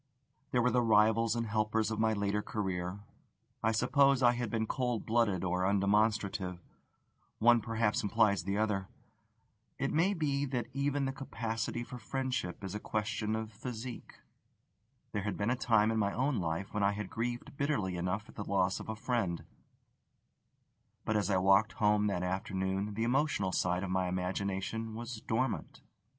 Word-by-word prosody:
There 125 -2 +2
were 125 - +3
the 125 +1 +3
rivals 110 0 +4
and 115 0 -1
helpers 110 0 0
of 110 - -2
my 110 0 +3
later 100 0 0
career: 95 -2 -3 0.6
I 110 - +2
suppose 135 +4 +3
I 120 - +7
had 120 -2 -2
been 110 +1 0
cold 125 -1 -1
blooded 110 -6 +2
or 90 0 0
undemonstrative 100 -1 +1 0.8
one 120 +1 +5
perhaps 115 -1 0
implies 105 -2 +3
the 100 +3 -2
other. 105 -3 0 0.9
It - - -1
may 180 +6 +3
be 145 -4 0
that 125 -4 -2
even 140 0 0
the 135 - -1
capacity 115 -3 -3
for 125 +1 -8
friendship 130 -9 -3
is 95 - -4
a 105 - -3
question 110 0 -2
of 110 0 -4
physique. 120 +2 -7 0.9
There 105 - -1
had 105 +1 -3
been 105 +4 0
a - - +2
time 110 -4 +3
in 110 - 0
my 100 -1 +1
own 130 0 +1
life 85 +2 -3
when 105 - -1
I 100 0 +3
had 105 -2 -5
grieved 120 +3 -3
bitterly 135 -11 0
enough 90 +5 -2
at - - -14
the 105 - -5
loss 95 -2 +1
of - - -8
a 110 - -2
friend; 110 -7 -1 1.6
but 110 - 0
as 105 -1 +1
I 95 - +3
walked 95 +4 +4
home 105 0 +3
that 90 -3 -1
afternoon 95 +2 -2
the 115 - -1
emotional 125 -6 +1
side 90 0 0
of 95 - -3
my 95 0 +1
imagination 95 +4 -2
was 115 -1 -6
dormant. 115 +2 -2
110 Hz, 170 wpm, -32 LUFS, 100-120 Hz, 1.6 s, I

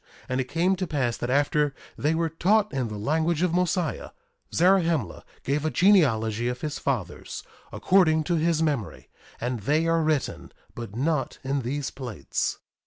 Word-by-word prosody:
And 130 +1 0
it - - -3
came 170 +7 +1
to 185 0 -2
pass 130 -7 0
that 120 - -3
after 145 +1 +2 0.2
they 150 +3 0
were 165 0 +1
taught 205 +4 +2
in 130 -3 -1
the 105 -1 -6
language 160 - 0
of 180 -2 +1
Mosiah, 180 -2 0 0.4
Zarahemla 170 - +2 0.2
gave 140 +2 0
a 155 - +1
genealogy 120 - +3
of 125 0 -3
his 150 -1 -3
fathers, 110 -11 -3 0.3
according 160 -5 +3
to 175 - -1
his 165 0 +2
memory; 140 -10 -3 0.3
and 120 0 -2
they 150 +10 +1
are 165 0 +2
written, 155 -4 -1 0.2
but 115 -3 -7
not 145 +2 -1
in 135 +1 -1
these 135 +3 -3
plates. 120 - -3
150 Hz, 165 wpm, -26 LUFS, 125-165 Hz, 0.4 s, genealogy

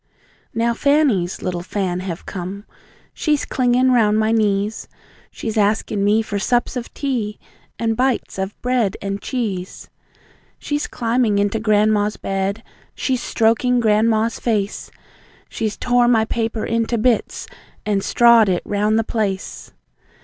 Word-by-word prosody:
Now 235 +1 +1
FANNY'S 260 - +1
little 175 -1 -2
Fan 185 -1 -2
have 180 -2 -6
come! 195 +2 -6 0.5
She's 300 -2 0
clingin' 255 0 +2
round 215 -4 +3
my 220 0 +2
knees, 210 -1 0 0.4
She's 220 -1 -3
asking 205 -1 +1
me 210 +2 +3
for 205 -2 -3
sups 240 +4 0
of 245 -1 -5
tea, 240 -7 -2 0.4
and 225 -1 0
bites 255 -4 -1
of 190 +1 -4
bread 245 -6 +1
and 200 0 -4
cheese. 205 -8 -4 0.7
She's 295 0 -3
climbing 230 -2 0
into 205 +2 +1
grandma's 210 -1 +2
bed, 195 +3 -2 0.3
she's 255 -3 -1
stroking 230 +3 +2
grandma's 220 0 +2
face. 210 -4 -2 0.6
She's 215 -2 -3
tore 245 0 +2
my 225 -2 +3
paper 225 -1 -2
into 230 +1 0
bits 230 +1 0 0.4
and 205 -2 +1
strawed 235 -3 +5
it 180 -2 0
round 210 +1 +1
the 225 - +2
place. 195 - -3
220 Hz, 135 wpm, -20 LUFS, 200-235 Hz, 0.7 s, strawed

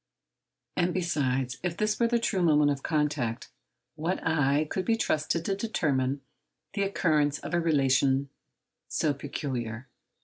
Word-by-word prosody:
And, 175 -1 +1
besides, 135 -8 0
if 175 -2 -2
this 215 0 0
were 235 - +4
the 235 0 +2
true 220 -5 0
moment 150 -3 +4
of 140 -1 -3
contact, 145 -7 -1 0.4
what 165 +4 -2
eye 150 -2 +2
could 185 - -2
be 230 - +2
trusted 160 -3 0
to 195 - 0
determine 140 - 0 0.5
the 200 - -1
occurrence 155 -7 +2
of - - -7
a 175 - +3
relation 135 -3 +2 0.6
so 150 - +1
peculiar? 130 -4 -4
150 Hz, 140 wpm, -28 LUFS, 135-175 Hz, 0.6 s, were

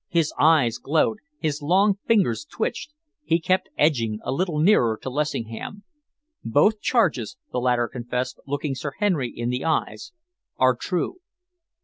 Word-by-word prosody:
His 165 -4 +1
eyes 150 -7 +4
glowed. 160 +9 +1 0.2
His 150 - -2
long 195 +6 +3
fingers 185 - +2
twitched. 220 - -4 0.3
He 165 - +2
kept 185 +3 0
edging 115 -8 +2
a - - -2
little 170 +2 -1
nearer 150 - +4
to 130 - -4
Lessingham. 145 - -4 0.6
"Both 205 - +3
charges," 235 +1 +1
the - - -1
latter 120 -1 +2
confessed, 125 +1 -4
looking 145 0 -2
Sir 140 +2 -5
Henry 175 - +1
in 120 +1 -3
the 125 +1 -2
eyes, 165 - -1 0.5
"are 130 -1 +4
true." 180 - -2
150 Hz, 140 wpm, -24 LUFS, 125-185 Hz, 0.6 s, eyes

